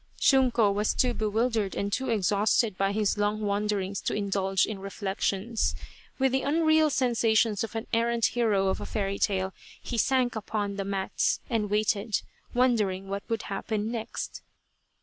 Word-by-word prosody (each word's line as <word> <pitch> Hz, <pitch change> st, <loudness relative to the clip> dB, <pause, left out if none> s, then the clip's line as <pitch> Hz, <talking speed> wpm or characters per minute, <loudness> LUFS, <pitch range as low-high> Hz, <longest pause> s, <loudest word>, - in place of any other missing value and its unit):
Shunko 245 Hz, -6 st, +4 dB
was 210 Hz, +1 st, 0 dB
too 250 Hz, -1 st, +2 dB
bewildered 220 Hz, -1 st, 0 dB
and 200 Hz, 0 st, -2 dB
too 265 Hz, +4 st, -1 dB
exhausted 210 Hz, +1 st, +2 dB
by 195 Hz, +1 st, +1 dB
his 210 Hz, 0 st, 0 dB
long 205 Hz, +1 st, 0 dB
wanderings 200 Hz, -1 st, -1 dB
to -, -, -2 dB
indulge 195 Hz, -2 st, +1 dB
in 215 Hz, -3 st, -5 dB
reflections. 195 Hz, +2 st, -2 dB, 0.4 s
With 265 Hz, -1 st, +2 dB
the 265 Hz, +1 st, +1 dB
unreal 315 Hz, +1 st, +3 dB
sensations 230 Hz, -5 st, +2 dB
of 225 Hz, -, -6 dB
an 225 Hz, -, -3 dB
errant 235 Hz, 0 st, +2 dB
hero 210 Hz, -5 st, +2 dB
of 190 Hz, -, -2 dB
a -, -, -5 dB
fairy 200 Hz, -2 st, -2 dB
tale, 190 Hz, -2 st, 0 dB, 0.3 s
he 235 Hz, -, -4 dB
sank 255 Hz, 0 st, +2 dB
upon 205 Hz, -2 st, -3 dB
the 195 Hz, -, -2 dB
mats 195 Hz, -1 st, 0 dB
and 215 Hz, -3 st, 0 dB
waited, 210 Hz, 0 st, 0 dB, 0.3 s
wondering 210 Hz, -7 st, +1 dB
what 200 Hz, +3 st, -5 dB
would 225 Hz, -1 st, -1 dB
happen 210 Hz, +2 st, -3 dB
next. 225 Hz, -2 st, -5 dB
215 Hz, 155 wpm, -27 LUFS, 200-235 Hz, 0.4 s, Shunko